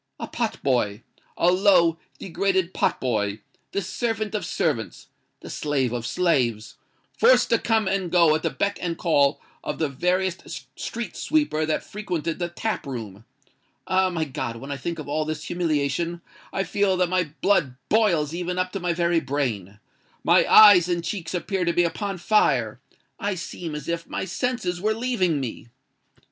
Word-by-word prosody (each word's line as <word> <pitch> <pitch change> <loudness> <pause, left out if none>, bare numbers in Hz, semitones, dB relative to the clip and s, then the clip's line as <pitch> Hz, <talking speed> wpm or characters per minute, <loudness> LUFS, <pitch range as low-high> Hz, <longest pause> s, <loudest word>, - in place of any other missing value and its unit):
A - - -3
pot 230 -2 -3
boy—a 125 +7 -1
low, 180 -4 +4 0.2
degraded 190 0 -1
pot - - 0
boy: 105 -4 -1 0.3
the 200 - -2
servant 220 +2 -2
of 210 - -2
servants—the 135 -9 -4
slave 135 -5 -1
of 120 -1 -3
slaves—forced 145 - +1
to - - +4
come 220 -3 +1
and 190 -2 0
go 170 -3 +5
at 155 - 0
the - - 0
beck 200 0 -2
and 170 -2 -2
call 145 -5 +2 0.2
of - - -3
the 160 -3 0
veriest 180 +6 -2
street 235 -4 -5
sweeper 295 - 0
that 155 - 0
frequented 175 -6 -4
the 175 -1 -2
tap 215 0 -3
room! 110 -5 -7 0.6
Ah! 185 0 +2
my 165 -3 -1
God—when 130 -1 -5
I 140 - -3
think 170 +5 -4
of 155 - -7
all 155 +2 0
this 155 0 -4
humiliation, 170 0 -1 0.3
I 195 - -1
feel 195 +1 +1
that 180 0 +2
my 185 0 +1 0.2
blood 150 -11 +2
boils 175 -9 +2
even 180 +1 -3
up 185 0 -1
to 195 - -4
my 175 -1 0
very 170 0 +2
brain—my 115 - -1
eyes 195 -5 +9
and 170 -1 0
cheeks 170 -1 -4
appear 185 +2 -1
to 170 -1 +1
be 175 - +3
upon 195 +3 -2
fire—I 165 - -1
seem 170 -2 -6
as 150 - -7
if 170 0 -3
my - - -3
senses 185 -3 -2
were 215 +2 +1
leaving 215 - 0
me!" 120 -3 -6
170 Hz, 160 wpm, -24 LUFS, 145-190 Hz, 0.6 s, eyes